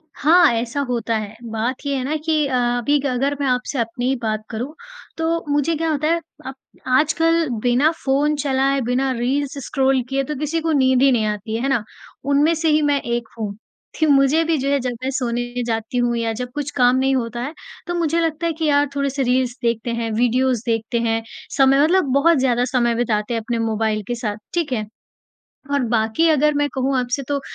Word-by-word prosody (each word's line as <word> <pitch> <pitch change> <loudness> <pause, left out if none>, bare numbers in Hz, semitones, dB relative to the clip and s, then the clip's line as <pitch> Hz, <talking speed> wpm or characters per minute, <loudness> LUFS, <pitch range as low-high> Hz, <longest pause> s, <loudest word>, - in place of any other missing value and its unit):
हाँ, 320 -3 +5
ऐसा 235 +4 -2
होता 230 -2 -1
है। 215 0 -6 0.2
बात 240 +5 -3
ये 280 -1 0
है 255 - -2
ना 300 +4 -2
कि 310 -2 +2
अ, 265 - -4 0.2
अभी 285 +4 +1
ग 280 - -5
अगर 280 +1 0
मैं 280 - 0
आपसे 250 +1 -1
अपनी 235 +2 -2
ही 265 - +2
बात 215 -1 -1
करूँ, 245 +7 -5 0.4
तो 330 0 -1
मुझे 295 +3 +1
क्या 325 +1 -1
होता 305 +1 0
है, 335 +1 +2 0.3
अब 265 - -6 0.4
आजकल 325 +1 +2 0.2
बिना 250 +6 +3
फ़ोन 290 +3 +2
चलाए, 275 -1 +1
बिना 255 +3 0
रील्स 275 +3 -1
स्क्रॉल 270 -3 +1
किए 270 0 0
तो 300 +2 -4
किसी 305 +2 -1
को 325 0 0
नींद 260 -3 +3
ही 275 -1 +5
नहीं 225 -3 +2
आती 210 +1 -3
है, 230 - -2
है 275 - 0
ना? 240 -5 +1 0.4
उनमें 285 +4 +3
से 320 0 0
ही 305 0 +3
मैं 290 -1 +1
एक 235 -1 -3
हूँ। 205 -2 -3 0.4
थि 315 - +3
मुझे 285 +2 +4
भी 325 -2 +1
जो 275 +1 -1
है, 280 0 +2
जब 250 0 -2
मैं 265 - -1
सोने 245 -1 -2
जाती 225 +1 -2
हूँ 240 -1 +1
या 230 -1 -1
जब 250 +2 -5
कुछ 290 -1 -3
काम 250 0 +4
नहीं 265 +1 +2
होता 240 -1 -2
है, 285 +6 -4 0.3
तो 350 - -2
मुझे 335 -1 +1
लगता 325 0 -1
है 330 - -1
कि, 320 0 -3
"यार, 290 -1 +3
थोड़े-से 280 -1 -1
रील्स 250 0 +1
देखते 235 0 0
हैं, 230 -1 -2
वीडियोज़ 245 0 +2
देखते 230 +1 -1
हैं।" 225 -1 0 0.4
समय 270 +1 +5
मतलब 355 +3 +3
बहुत 315 +3 +4
ज़्यादा 245 -2 +2
समय 240 -2 +1
बिताते 220 -1 -1
हैं 230 - -1
अपने 230 +1 -3
मोबाइल 220 -1 0
के 240 - -2
साथ। 215 -3 -3 0.2
ठीक 330 -7 -1
है? 215 -3 -2 0.9
और 285 - +2
बाकी 225 +8 +2
अगर 300 0 +3
मैं 290 0 +1
कहूँ 265 +1 0
आपसे 250 +3 -1
तो, 285 -1 0
265 Hz, 215 wpm, -20 LUFS, 235-290 Hz, 0.9 s, हाँ